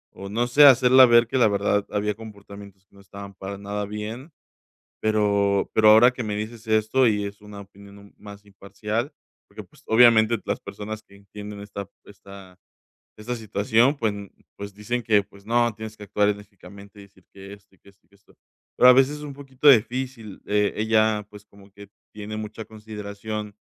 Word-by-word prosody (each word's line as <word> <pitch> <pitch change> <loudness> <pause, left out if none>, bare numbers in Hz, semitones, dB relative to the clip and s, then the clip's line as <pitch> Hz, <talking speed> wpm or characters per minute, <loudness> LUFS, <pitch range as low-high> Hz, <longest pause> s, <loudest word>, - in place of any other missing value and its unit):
o 100 0 -9
no 120 +4 -1
sé, 145 +4 +6
hacerla 130 -1 +7
ver, 120 -1 +4
que 130 - -2
la 120 - +4
verdad, 100 0 0
había 105 0 -2
comportamientos 100 -3 -13
que - - -28
no 100 - -17
estaban 100 0 -12
para 95 +1 -8
nada 100 +1 -5
bien. 110 +8 -7 0.7
Pero 100 -2 0
pero 110 -1 +5
ahora 110 +4 +7
que 125 - -6
me 105 -2 -4
dices 110 +2 -7
esto, 110 +4 +2
y 105 -2 0
es 100 0 -9
una 105 -1 -11
opinión 100 0 -16
un 100 0 -18
más 100 0 -13
imparcial. 105 +5 -5 0.4
Porque, - - -11
pues, - - -24
obviamente, 115 -1 +5
las - - -3
personas 105 +2 -8
que 100 - -23
entienden 100 +1 -11
esta 100 -1 -8 0.2
esta 100 -2 -15 0.6
esta 110 +3 -6
situación, 110 +4 +1
pues 110 -6 -1 0.4
pues, 100 0 -9
dicen 120 +4 -4
que: 105 -2 +2
"Pues 100 0 -20
no, 120 +1 +1
tienes 110 +1 -9
que 105 - -11
actuar 105 0 0
enérgicamente, 100 0 -9
y - - -12
decir 100 0 -21
que 100 0 -12
esto, 100 -1 -17
y - - -29
que - - -22
esto, 100 -3 -24
y - - -41
que 100 - -29
esto". 100 - -26 0.4
Pero 125 - +6
a - - +10
veces, 135 +3 +3
es 150 - -11
un 145 - -7
poquito 135 0 -1
difícil. 125 -3 +1
Eh, 105 0 0
ella, 110 -1 +1
pues, 105 -1 -14
como 100 -1 -20
que 100 0 -15 0.2
tiene 105 0 -8
mucha 110 +1 -7
consideración 105 -1 -8
105 Hz, 190 wpm, -23 LUFS, 100-110 Hz, 0.7 s, a